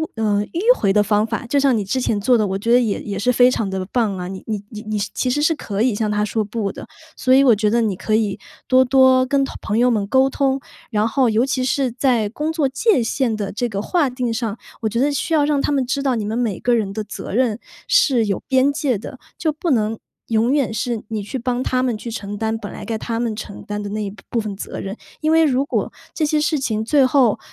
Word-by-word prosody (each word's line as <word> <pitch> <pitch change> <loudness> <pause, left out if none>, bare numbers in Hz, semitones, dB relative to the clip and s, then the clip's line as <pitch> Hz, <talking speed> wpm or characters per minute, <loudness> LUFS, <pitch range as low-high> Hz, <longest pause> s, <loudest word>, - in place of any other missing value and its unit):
呃， 210 -2 +1
迂 450 +9 +3
回 195 - +2
的 210 0 +4
方 210 +1 +1
法。 225 +1 -3
就 280 +3 +2
像 270 -4 +3
你 210 - -1
之 230 +7 -1
前 220 -4 0
做 245 +2 +4
的， 210 -2 +1
我 190 - -2
觉 230 +4 -1
得 245 - +7
也 225 -5 -1
也 200 -2 -4
是 245 - 0
非 250 +1 +5
常 215 -5 -1
的 190 -1 -3
棒 220 -6 0
啊， 180 0 -5
你 190 0 -7
你 210 -2 -3
你 215 -2 -8
你 215 0 -3 0.2
其 255 - -1
实 295 +4 0
是 315 +2 +3
可 210 -9 -4
以 245 0 +3
向 210 +1 -1
他 210 0 0
说 215 0 -1
不 205 -2 -3
的， - - -10 0.3
所 255 - +2
以 275 - +6
我 250 -4 +6
觉 210 0 +1
得 235 +2 +2
你 215 -3 +1
可 215 - 0
以 210 -3 0 0.3
多 260 0 +5
多 260 0 +5
跟 275 +1 +1 0.2
朋 215 +1 -1
友 250 +1 +4
们 210 -3 0
沟 265 +5 +3
通， 270 -1 0 0.3
然 210 -1 +1
后 250 +2 +2
尤 225 +3 +2
其 265 -1 -1
是 265 -1 0
在 240 -4 +1
工 300 +8 -3
作 300 -4 +1
界 275 - +2
限 230 -1 0
的 205 -2 -4
这 245 +3 -2
个 200 -3 -3
划 300 - +1
定 250 -2 -2
上， 225 -2 -3 0.2
我 220 - 0
觉 230 - -4
得 290 +2 +2
需 325 +3 -2
要 305 -2 +4
让 290 -2 +1
他 - - 0
们 265 -2 +1
知 275 +2 -1
道 270 -3 +1
你 220 - -2
们 220 +3 -2
每 225 -6 -1
个 245 - +1
人 205 -4 -1
的 215 +1 -3
责 205 - -7
任 235 -1 +1 0.3
是 290 - +4
有 195 - -1
边 265 +2 +3
界 280 -6 0
的。 250 +5 -9 0.2
就 315 - 0
不 310 +2 -2
能 220 -2 +1 0.3
永 230 +3 +2
远 275 -6 +1
是 230 0 -2
你 215 -2 -3
去 235 +6 -5
帮 245 +1 -1
他 255 -1 0
们 245 -4 0
去 235 - -7
承 205 -2 -5
担 220 +1 -1
本 205 -2 -7
来 - - -8
该 225 -2 -2
他 230 +1 -3
们 230 -2 -1
承 210 -2 -8
担 210 0 -4
的 205 - -5
那 215 +1 -3
一 200 - -3 0.2
部 235 - 0
分 210 -2 -4
责 195 - -6
任， 195 +1 -5 0.3
因 310 - +1
为 325 0 +5
如 275 -2 +2
果 - - -2 0.2
这 315 - 0
些 300 0 +1
事 305 +1 +1
情 220 -4 -1
最 280 +1 +4
后， 255 -4 +3
235 Hz, 285 characters per minute, -20 LUFS, 215-265 Hz, 0.3 s, 得